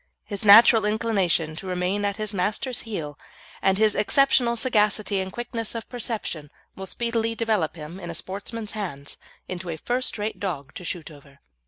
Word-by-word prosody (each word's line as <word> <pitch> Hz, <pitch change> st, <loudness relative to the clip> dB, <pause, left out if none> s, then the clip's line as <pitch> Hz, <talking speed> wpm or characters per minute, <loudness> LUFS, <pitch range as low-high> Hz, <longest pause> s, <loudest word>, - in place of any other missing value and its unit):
His 200 Hz, -1 st, -5 dB
natural 220 Hz, +1 st, +9 dB
inclination 195 Hz, -7 st, +1 dB
to 190 Hz, -, -7 dB
remain 185 Hz, +3 st, 0 dB
at 200 Hz, 0 st, -1 dB
his 215 Hz, -1 st, -2 dB
master's 210 Hz, +6 st, -1 dB
heel 150 Hz, -8 st, -5 dB, 0.4 s
and 190 Hz, 0 st, +3 dB
his 215 Hz, 0 st, +4 dB
exceptional 245 Hz, +1 st, +3 dB
sagacity 215 Hz, -4 st, +2 dB
and 190 Hz, 0 st, -3 dB
quickness 235 Hz, 0 st, -4 dB
of 230 Hz, -, -5 dB
perception 215 Hz, -, -4 dB, 0.3 s
will 190 Hz, 0 st, -6 dB
speedily 230 Hz, +1 st, -1 dB
develop 215 Hz, -9 st, 0 dB
him, 165 Hz, +3 st, -8 dB
in 175 Hz, -, -7 dB
a 170 Hz, -, -4 dB
sportsman's 205 Hz, +5 st, -5 dB
hands, 170 Hz, -10 st, -5 dB, 0.3 s
into 180 Hz, -1 st, -5 dB
a 160 Hz, -, -3 dB
first 250 Hz, +7 st, -1 dB
rate 210 Hz, +1 st, -3 dB
dog 155 Hz, -7 st, -4 dB
to -, -, -8 dB
shoot 170 Hz, -2 st, -5 dB
over. 140 Hz, -1 st, -16 dB
205 Hz, 170 wpm, -25 LUFS, 175-225 Hz, 0.4 s, natural